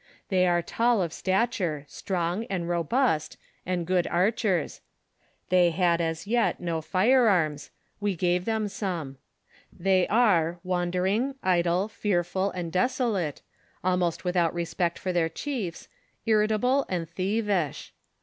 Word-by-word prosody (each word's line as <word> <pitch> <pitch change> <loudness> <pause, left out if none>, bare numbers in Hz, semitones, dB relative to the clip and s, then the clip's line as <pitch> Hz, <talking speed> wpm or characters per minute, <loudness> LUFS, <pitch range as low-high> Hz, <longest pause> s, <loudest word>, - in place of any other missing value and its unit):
They 185 -1 +3
are 175 -1 +2
tall 235 +3 +1
of 165 -2 -4
stature, 185 - -1
strong, 180 +6 -2
and 180 -5 -3
robust, 175 - 0 0.3
and 180 -2 -1
good 180 0 +1
archers; 190 -1 0 0.7
thev 175 -2 +4
had 170 -1 +2
as 165 +1 -2
yet, 235 +3 +1
no 170 -2 -2
firearms; 185 - +2 0.3
we 205 -2 -1
gave 175 +1 0
them 220 -2 0
some. 170 -10 -4 0.5
They 185 0 +2
are, 175 -7 +3
wander 180 0 -1
ing, 235 +8 0
idle, 180 +1 +2
fearful, 190 -3 -1
and 175 -3 -5
desolate, 200 - 0 0.4
almost 180 -1 0
without 175 -2 +1
respect 170 0 -1
for 185 -2 -3
their 165 -2 +1
chiefs, 205 - -5 0.4
irritable, 220 +5 +2
and 175 -3 -2
thievish. 190 -2 -1
185 Hz, 125 wpm, -27 LUFS, 170-210 Hz, 0.7 s, thev